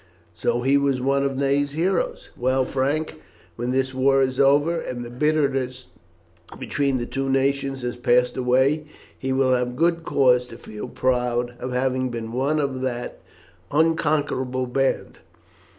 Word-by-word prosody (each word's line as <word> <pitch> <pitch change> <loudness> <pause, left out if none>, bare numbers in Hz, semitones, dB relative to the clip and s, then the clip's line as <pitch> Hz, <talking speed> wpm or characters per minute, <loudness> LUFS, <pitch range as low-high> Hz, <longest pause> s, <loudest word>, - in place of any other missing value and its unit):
So 120 +7 -1
he 135 +2 +4
was 140 -2 +1
one 135 +2 +1
of 135 -1 -1
Ney's 140 +1 +1
heroes! 175 +4 -1
Well, 130 +1 +1
Frank, 140 - -2 0.3
when 120 +1 -3
this 130 +1 0
war 135 +1 +3
is 130 -1 -2
over, 145 +5 +4
and 120 -4 -5
the 120 - -9
bitterness 135 -3 0 0.7
between 140 -2 -1
the 120 - -3
two 135 +2 -3
nations 135 0 0
has 120 0 -3
passed 125 0 +2
away, 130 +4 +2 0.3
he 130 - -4
will 130 -1 +3
have 125 0 0
good 165 +3 +1
cause 125 -5 +3
to 115 - -11
feel 110 -1 -8
proud 125 -1 0
of 125 - -4
having 130 0 0
been 115 -2 -5
one 135 +5 0
of 135 -3 -2
that 120 -2 -4 0.5
unconquerable 145 -5 +1
band. 135 +2 -1
130 Hz, 150 wpm, -23 LUFS, 125-140 Hz, 0.7 s, he